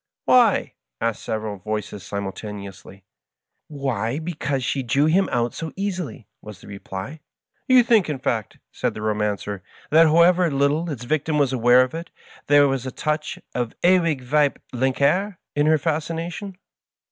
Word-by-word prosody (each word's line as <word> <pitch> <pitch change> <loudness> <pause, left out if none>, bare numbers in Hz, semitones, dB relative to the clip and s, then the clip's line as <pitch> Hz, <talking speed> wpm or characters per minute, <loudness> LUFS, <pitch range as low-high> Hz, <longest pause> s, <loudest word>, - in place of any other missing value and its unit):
"Why?" 240 -5 +4 0.3
asked 115 -3 -1
several 110 -2 -4
voices 105 +1 -5
simultaneously. 100 -1 -7 0.6
"Why, 135 -5 -2
because 150 -5 -3
she 135 +3 -1
drew 135 +4 +2
him 180 +5 +3
out 120 -1 0
so 165 -1 -5
easily," 185 - -4
was 105 -3 -11
the - - -15
reply. 100 +7 -7 0.2
" - - -48
You 255 -1 +6
think, 225 -7 +3
in 150 - -2
fact," 115 -5 -2
said - - -2
the 105 - -6
Romancer, 105 -2 -2 0.2
" - - -25
that 160 +2 +7
however 170 +2 +5
little 145 +4 +1
its 130 -6 -5
victim 155 +4 0
was 140 -3 +2
aware 125 +1 +5
of 130 - -5
it, 165 +1 -6 0.4
there 145 0 +6
was 135 -1 -2
a - - -4
touch 150 +2 -2 0.2
of 120 -2 -1
the - - -25
Ewig 165 -7 +2 0.5
weibliche 140 - +1 0.2
in 145 +1 +2
her 155 0 +5
fascination 165 +5 -3
140 Hz, 160 wpm, -23 LUFS, 110-165 Hz, 0.6 s, that